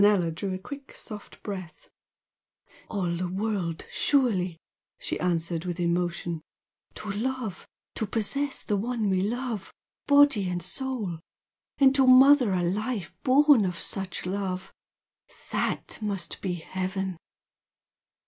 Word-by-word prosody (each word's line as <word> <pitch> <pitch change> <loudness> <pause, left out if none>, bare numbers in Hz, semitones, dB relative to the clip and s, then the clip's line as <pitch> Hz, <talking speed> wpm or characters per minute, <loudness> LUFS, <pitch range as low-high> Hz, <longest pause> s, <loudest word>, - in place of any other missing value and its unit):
Manella 195 -5 +4
drew 190 +4 -3
a - - -3
quick 275 +8 -9
soft 210 -3 -7
breath. 185 -6 -7 1.0
"All 190 -5 -1
the 175 +1 -1
world, 190 -3 -2
surely!" 195 - +2 0.4
she - - -3
answered, 170 -2 0
with 180 -1 -4
emotion 175 -1 -1 0.5
"To 210 - -5
love! 225 -2 -3 0.3
to 220 - -2
possess 270 +7 0
the 210 - 0
one 220 -1 0
we 185 -1 +2
love, 230 0 -2 0.4
body 285 -9 +5
and 175 -1 -2
soul! 210 -4 -3 0.6
and 270 -1 +6
to 270 -1 +4
mother 255 -2 +8
a 180 -1 +1
life 210 +2 -2
born 280 -2 +6
of 180 -2 -1
such 190 0 -4
love! 190 0 -3 0.8
THAT - - -1
must 200 -5 -3
be 185 -3 -1
heaven!" 185 +1 -3
200 Hz, 125 wpm, -27 LUFS, 180-245 Hz, 1.0 s, mother